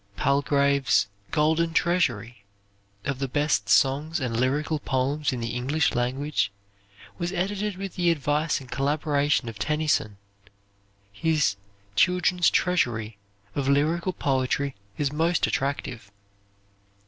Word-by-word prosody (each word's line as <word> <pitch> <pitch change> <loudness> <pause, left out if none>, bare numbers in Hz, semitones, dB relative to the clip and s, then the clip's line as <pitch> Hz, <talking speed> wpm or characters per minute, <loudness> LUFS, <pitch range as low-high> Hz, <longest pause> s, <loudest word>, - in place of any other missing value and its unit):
Palgrave's 140 -3 +2 0.2
"Golden 160 +2 +1
Treasury" 125 - 0 0.6
of 140 -2 -2
the 135 - -1
best 140 -6 0
songs 145 +5 +3
and 125 -4 -2
lyrical 145 +6 0
poems 140 +2 0
in 125 -2 -4
the 115 - -3
English 135 +6 0
language 125 -1 -1 0.7
was 175 0 -2
edited 195 +2 -2
with 195 -1 -6
the 175 -1 +3
advice 150 0 +1
and 130 -3 -13
collaboration 145 -1 +1
of 110 -3 -7
Tennyson. 150 -5 0 0.9
His 150 0 +1 0.4
"Children's 180 - +3
Treasury" 115 - 0 0.3
of 135 +2 -1
lyrical 160 +6 +1
poetry 135 0 0 0.2
is 145 -1 -1
most 165 +2 +2
attractive. 130 -6 -3
145 Hz, 110 wpm, -26 LUFS, 130-160 Hz, 0.9 s, songs